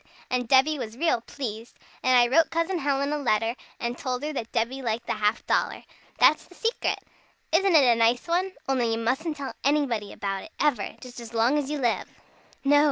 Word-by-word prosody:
And 250 -1 0
Debby 275 +4 +4
was 225 -1 -6
real 320 -6 +1
pleased. 230 -3 -7 0.2
And 255 -1 +4
I 240 0 +6
wrote 330 -1 +5
Cousin 335 +2 -1
Helen 280 0 0
a 300 - -1
letter, 225 -4 +1 0.3
and 235 0 -2
told 255 +1 -3
her 305 +1 -3
that 230 -5 -5
Debby 250 +4 -1
liked 230 -2 -2
the - - -1
half 210 +1 0
dollar. - - 0 0.3
That's 310 - +5
the 360 - -18
secret! 455 +5 -1 0.5
Isn't 365 +2 +3
it 295 - +7
a 245 -2 +6
nice 230 +4 +2
one? 365 +3 0
Only 245 -4 +1
you - - -1
mustn't 270 +8 -1
tell 275 -1 -5
anybody 260 -8 +1
about 195 -1 -3
it, 320 - -13
ever 275 -9 0
just 250 -1 -10
as 235 0 -9
long 230 +5 +3
as 285 -2 -4
you 300 - -2
live." 245 -4 0 0.5
"No!" 290 +1 +5
260 Hz, 205 wpm, -26 LUFS, 230-300 Hz, 0.5 s, it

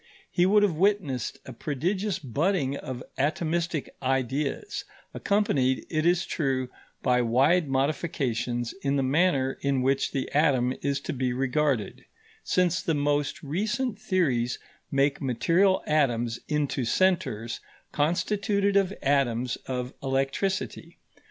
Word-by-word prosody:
He 175 +1 +3
would 210 +1 +5
have 200 -4 +3
witnessed 170 - 0
a 130 - -8
prodigious 175 - -1
budding 140 - 0
of 130 -3 -6 0.2
atomistic 160 +2 0
ideas, 135 - -1 0.3
accompanied, 140 -11 +1
it 155 0 +1
is 175 +1 +3
true, 130 -5 -1 0.3
by 125 0 +3
wide 140 +8 +3
modifications 135 -4 -1
in 140 0 0
the 135 - +1
manner 135 -1 +2
in 135 -2 +1
which 135 +1 +1
the 135 -2 -2
atom 130 -4 +3
is 140 0 0
to - - -4
be 130 -2 -1
regarded, 135 -2 0 0.4
since 180 -1 +1
the 165 - 0
most 145 0 0
recent 210 - -1
theories 135 - +1 0.3
make 140 +1 +1
material 165 - +2
atoms 120 -6 +1
into 150 -3 0
centres 120 - +1 0.3
constituted 200 +6 +1
of 195 -2 +3
atoms 125 -4 +1
of 125 0 -3
electricity. 135 +8 -2
140 Hz, 120 wpm, -27 LUFS, 130-175 Hz, 0.4 s, would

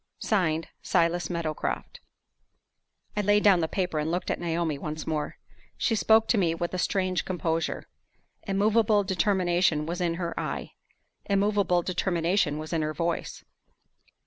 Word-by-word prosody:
(Signed) 165 -6 0
"SILAS 170 +1 +1
MEADOWCROFT." 170 -3 -3 1.2
I 210 - +1
laid 205 +1 +3
down 195 -4 +6
the 160 - 0
paper, 180 -3 -1
and 150 +1 -1
looked 175 +2 -1
at - - -2
Naomi 165 -3 -1
once 155 +1 -5
more. 155 -2 -3 0.4
She 230 - +1
spoke 220 +1 +4
to 225 - +3
me 165 -3 +2
with 175 +1 -3
a 185 - -2
strange 185 -1 0
composure. 165 -2 -2 0.6
Immovable 210 +1 +3
determination 180 -5 +1
was 175 +3 -4
in 170 -1 0
her 170 -1 -3
eye; - - -4 0.5
immovable 200 -3 +2
determination 175 -3 0
was 155 +2 -6
in 165 - +1
her 155 0 -2
voice. 170 +2 -2
175 Hz, 145 wpm, -27 LUFS, 165-195 Hz, 1.2 s, down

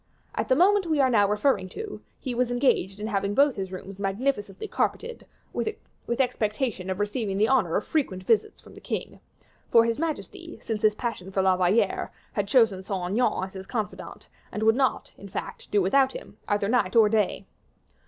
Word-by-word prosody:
At - - -2
the 260 - +5
moment 380 +4 +4
we 310 -2 +1
are 260 -2 +4
now 205 -4 +4
referring 210 -3 +1
to, 425 - -7 0.2
he 255 - -4
was 245 0 +1
engaged 245 -6 +1
in 210 - -4
having 200 -1 -1
both 280 -1 +4
his 190 -2 -4
rooms 190 +1 -8
magnificently 205 - -2
carpeted, 470 +3 -2 0.3
with 255 - -5
expectation 215 -5 -1
of 190 +1 -2
receiving 205 -1 -1
the 215 +2 +3
honor 225 -11 +2
of - - 0
frequent 205 -12 -1
visits 220 +1 +1
from - - -16
the - - -13
king; - - -5 0.5
for 230 -1 +6
his 230 +2 -1
majesty, 330 +2 -5
since 220 -2 -3
his 215 -1 +3
passion 210 -6 -4
for 190 0 +1
La 190 -1 +4
Valliere, 185 +5 +1 0.2
had 205 -1 -1
chosen 215 -4 +3
Saint 185 -2 -3
Aignan 230 -2 +1
as 190 - -6
his 190 0 -8
confidant, 215 -4 -5 0.2
and 210 - -3
could 225 0 +5
not, 265 -1 0
in 200 - -10
fact, - - -6
do 205 -2 +2
without 265 +8 +3
him, - - -9
either 205 -1 +1
night 220 -4 +1
or 225 -2 +7
day. 210 -3 0
215 Hz, 195 wpm, -26 LUFS, 195-260 Hz, 0.5 s, or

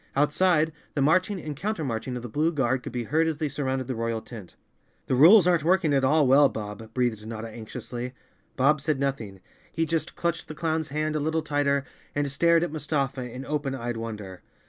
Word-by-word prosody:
Outside, 155 +3 +3 0.2
the 145 - +1
marching 185 +6 +2
and 155 -3 -6
coun¬ 210 +9 -2
termarching 125 - -3
of 120 - -5
the - - -4
blue 150 +8 +1
guard 130 -4 0
could - - -7
be 120 0 -3
heard 160 +7 +1
as 160 -2 -1
they 155 0 -1
surrounded 135 -2 -2
the 130 - -3
royal 115 -1 -2
tent. 110 -5 -11 0.5
"The - - -1
rules 170 - +8
aren't 175 -4 +3
working 170 -2 +3
at 135 -1 +2
all 150 +3 +4
well, 135 +2 +6
Bob," 110 +1 -7
breathed 120 -4 0
Notta 110 0 -5
anxiously. 120 +3 -7 0.4
Bob 140 +3 +3
said 150 -2 0
nothing. 115 -9 -3 0.3
He 165 - 0
just 165 0 -2
clutched 170 -1 -2
the 155 - -8
clown's 160 -1 -1
hand 155 +2 -2
a - - +1
little 160 +2 -1
tighter 145 -2 +1 0.3
and 145 -1 0
stared 170 +4 +3
at 175 - -2
Mustafa 140 -5 -2
in 130 +3 -7
open 145 -2 -2
eyed 120 -2 -4
wonder. 105 -5 -6
140 Hz, 205 wpm, -26 LUFS, 125-155 Hz, 0.5 s, rules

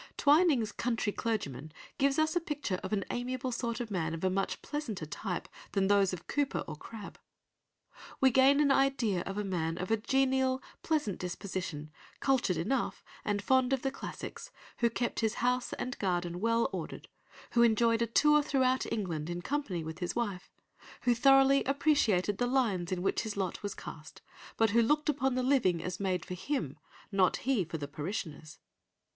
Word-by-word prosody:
Twining's 290 -6 +4
Country 230 -4 -1
Clergyman 155 - -3 0.3
gives 275 0 +3
us 315 +2 +2
a - - +4
picture 290 - -3
of - - -5
an 200 -3 0
amiable 255 +1 -3
sort 235 -1 -2
of 235 -3 -5
man 165 -4 -1
of 165 - -8
a 185 - +2
much 195 +1 -2
pleasanter 235 - -4
type 180 +3 -4 0.3
than 195 -1 +2
those 200 -2 +4
of 180 -2 -6
Cowper 290 -1 -1
or - - -5
Crabbe. 210 +6 -10 1.0
We 265 -1 +5
gain 265 +3 +5
an 290 -2 +4
idea 270 -9 +2
of 195 +1 -4
a 210 - -1
man 165 -4 -2
of 185 +3 -4
a 225 - +4
genial, 265 +2 +2 0.2
pleasant 295 - -1
disposition, 180 -4 -5 0.3
cultured 255 - +2
enough, 210 +12 -1 0.2
and 205 -1 -1
fond 260 +1 +3
of 265 - 0
the 270 - 0
classics; - - -7 0.3
who 235 - +3
kept 240 +1 -2
his 220 -2 0
house 250 +1 0
and 255 - -4
garden 175 -2 -1
well 230 +2 +2
ordered, - - -6 0.4
who 235 - +3
enjoyed 230 0 +4
a 230 - +2
tour 300 +6 +5
throughout 260 -2 +1
England 170 -7 -2
in 175 0 -4
company 260 - -2
with 160 +1 -7
his 175 -1 -3
wife, 205 -6 -3 0.5
who 245 - +3
thoroughly 270 +2 +5
appreciated 240 - +2
the 245 - +2
lines 215 -10 +1
in 180 -1 -1
which - - +1
his 215 -3 -5
lot 190 -3 -2
was 205 -2 -4
cast, 155 -1 -10 0.3
but 225 -2 +3
who 235 +2 +5
looked 300 +6 +2
upon 265 -3 +1
the 255 - 0
living 250 -10 +3
as 180 0 -4
made 185 -3 -1
for - - -6
him, 175 - -3 0.3
and 195 - -5
not 185 - +4
he 255 -7 +2
for 165 0 -5
the 145 -2 -5
parishioners. 155 0 -5
225 Hz, 185 wpm, -31 LUFS, 185-265 Hz, 1.0 s, We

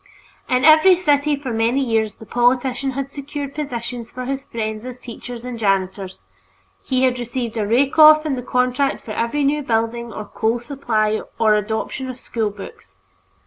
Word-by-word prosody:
In 255 +1 +2
every 315 +4 +7
city 295 -4 +2
for 270 -4 -5
many 230 +4 +1
years 225 -3 0
the 220 - -13
politician 250 +3 +1
had 275 +1 -4
secured 280 0 -6
positions 240 -5 -5
for 255 0 -6
his 270 +1 -4
friends 220 -1 -4
as 250 0 -7
teachers 245 0 -9
and 245 -2 -6
janitors; 195 -2 -1 0.6
he 255 0 0
had 250 -1 +2
received 240 -1 -4
a 215 -2 -1
rake 265 +7 +2
off 310 0 +8
in 300 - 0
the 250 - -4
contract 250 +2 0
for 220 - -6
every 235 +7 -1
new 295 +2 +1
building 230 -1 -1
or 215 - -6
coal 220 +3 -1
supply 230 -4 -1 0.2
or 220 -2 +4
adoption 220 +5 -2
of 255 - -6
school 225 -4 -2
books. 195 - -12
245 Hz, 175 wpm, -20 LUFS, 225-275 Hz, 0.6 s, off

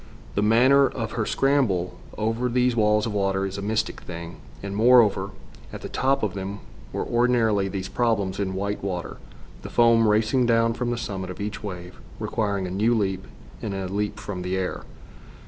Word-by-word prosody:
The 100 - 0
manner 130 +6 +5
of 115 -3 -4
her 110 -3 -2
scramble 125 -11 +1 0.2
over 115 +3 0
these 125 0 +2
walls 105 -1 +3
of 110 - -3
water 95 -1 0
is 95 +1 -4
a - - -4
mystic 110 +2 -1
thing, 85 -1 -8 0.3
and, 100 0 -4
moreover, 110 -4 +5 0.4
at - - -8
the - - -5
top 135 -1 +1
of 105 -4 0
them 100 +1 -5 0.3
were - - -2
ordinarily 120 -4 +2
these 95 -1 -4
problems 105 -6 0
in 95 -2 -2
white 100 +1 -3
water, 90 -3 -4 0.4
the - - -8
foam 115 -1 +4
racing 110 +4 +2
down 115 0 +3
from 120 +1 -2
the 120 - -1
summit 95 -5 -4
of 90 - -7
each 105 +1 -4
wave, 90 -3 -7 0.2
requiring 100 -3 -1
a 90 - -5
new 110 +5 +2
leap, 95 -3 -1 0.3
and 100 -3 -3
a 95 -1 -3
leap 105 +2 -2
from 95 -4 -5
the 90 +1 -2
air. 95 -1 -3
105 Hz, 185 wpm, -25 LUFS, 95-115 Hz, 0.4 s, manner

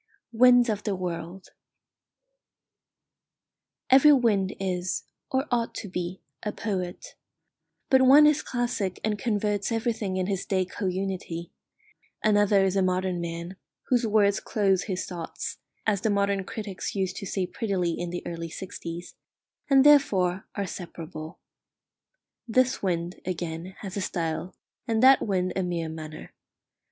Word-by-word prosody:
WINDS 245 +1 +6
OF 210 -2 -1
THE 205 -2 -1
WORLD 180 0 -5 2.4
Every 275 +3 +8
wind 210 -8 +3
is, 185 -2 -2 0.3
or 265 +1 0
ought 235 -1 0
to 210 - -5
be, 180 0 -5 0.2
a 210 - -2
poet; 185 -5 -4 0.8
but 265 -1 +6
one 275 +4 +8
is 300 0 +4
classic 240 -6 -2
and 210 -1 0
converts 210 -2 0
everything 225 -4 -1
in 185 - 0
his 195 -1 -2
day 185 -2 0
co 190 +2 -4
unity; 185 -2 -3 0.7
another 205 -2 +4
is 190 0 0
a 195 - +3
modern 185 -1 0
man, 170 +2 -5 0.3
whose 245 -2 +3
words 205 -1 +3
clothe 195 -3 +1
his 185 -3 -3
thoughts, 170 -3 -6 0.3
as 205 -3 +1
the 220 - +1
modern 200 -1 +1
critics 205 -2 -5
used 190 -2 -1
to 200 - -5
say 190 0 -1
prettily 185 -4 -1
in 175 +1 -3
the 175 0 -5
early 165 -1 -5
sixties, 175 -1 -7 0.6
and 270 -1 +6
therefore 195 -11 +4
are 200 - -1
separable. 165 -2 -8 1.1
This 255 +2 +2
wind, 175 -2 -2
again, 175 0 -4
has 195 -3 -6
a 200 - -2
style, 170 0 -3 0.3
and 225 0 +1
that 265 +1 +8
wind 185 -2 0
a 190 - 0
mere 170 -3 -2
manner. 155 -1 -8
195 Hz, 140 wpm, -27 LUFS, 180-220 Hz, 2.4 s, Every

